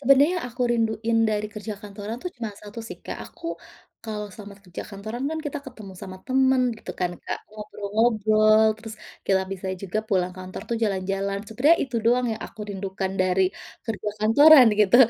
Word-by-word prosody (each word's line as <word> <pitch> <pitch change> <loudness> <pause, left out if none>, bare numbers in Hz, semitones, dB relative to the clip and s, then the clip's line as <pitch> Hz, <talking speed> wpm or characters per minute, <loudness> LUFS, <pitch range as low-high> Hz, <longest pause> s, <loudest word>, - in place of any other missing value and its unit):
Sebenarnya 275 +2 +6
yang - - -6
aku 245 +1 -4
rinduin 225 0 +1
dari 210 0 0
kerja 210 0 -5
kantoran 205 +2 -6
tuh 360 - -3
cuma 230 -3 -4
1 210 +2 -9
sih - - -8
Kak, - - -5
aku 335 - -11 0.6
kalau 210 -1 -4
selama 205 -1 -10
kerja 180 -3 -7
kantoran 215 +5 -5
kan 320 - -2
kita 295 - -3
ketemu 215 -7 -9
sama 190 -1 -7
temen 265 0 +3 0.2
gitu - - -8
kan 180 -1 +1
Kak, - - -3
ngobrol-ngobrol 215 +1 +3
terus 225 -1 -8 0.3
kita 190 -1 +3
bisa 190 0 -6 0.2
juga 195 +2 -2
pulang 185 -2 +1
kantor 185 0 -7
tuh 230 - +1
jalan-jalan. 195 0 -1
Sebenarnya 280 +10 +4
itu 245 -3 -4
doang 245 +1 +3
yang 220 - -5
aku 215 - -14
rindukan 190 -1 -3
dari 185 +1 +2 0.4
kerja 215 -2 -2
kantoran 280 +5 +8
gitu, 210 +3 +6
215 Hz, 175 wpm, -25 LUFS, 200-240 Hz, 0.6 s, kantoran